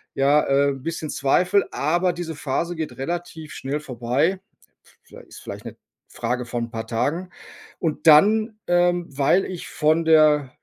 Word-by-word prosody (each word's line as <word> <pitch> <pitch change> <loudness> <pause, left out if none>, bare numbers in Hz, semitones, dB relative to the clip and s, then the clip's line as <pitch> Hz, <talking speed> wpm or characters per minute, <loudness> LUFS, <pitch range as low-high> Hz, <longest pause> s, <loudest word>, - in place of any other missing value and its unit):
Ja, 140 +2 +4
äh, 140 0 +2
'n 135 -2 -5
bisschen 160 0 -4
Zweifel. 180 +8 +2
Aber 175 +4 +1
diese 170 -1 -6
Phase 155 +4 -3
geht 160 -1 -5
relativ 160 +1 -5
schnell 140 +3 -4
vorbei. 135 - -1 0.6
Viellei - - -14
ist - - -14
vielleicht - - -8
'ne - - -8 0.3
Frage 125 0 -3
von 120 0 -3
'n - - -20
paar 110 0 -6
Tagen. 160 +10 -2 0.5
Und 160 0 -2
dann, 215 +8 +5
ähm, 175 0 +2
weil 145 +7 +2
ich 180 -2 -7
von 160 +2 +1
der 150 -4 +4
155 Hz, 160 wpm, -22 LUFS, 140-175 Hz, 0.6 s, dann